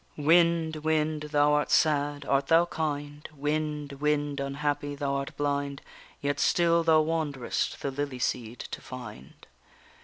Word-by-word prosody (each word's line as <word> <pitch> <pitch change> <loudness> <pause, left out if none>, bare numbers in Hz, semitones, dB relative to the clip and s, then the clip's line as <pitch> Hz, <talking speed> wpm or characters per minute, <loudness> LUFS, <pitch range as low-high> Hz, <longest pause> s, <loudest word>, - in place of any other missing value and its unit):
_Wind, 165 +1 +3
wind! 155 -1 0
thou 145 0 +4
art 150 0 +1
sad, 145 -2 +2
art 135 0 +1
thou 165 +1 +5
kind? 145 -3 -4
Wind, 150 0 -2
wind, 145 -1 0
unhappy! 145 +1 -2
thou 140 -1 -2
art 140 0 -5
blind, 140 -1 -1 0.4
Yet 145 0 -1
still 170 -1 +3
thou 160 -1 +5
wanderest 155 -5 -2
the 140 - -1
lily 140 -1 -3
seed 120 -1 -2
to - - -6
find. 110 - -10
145 Hz, 135 wpm, -28 LUFS, 140-155 Hz, 0.4 s, thou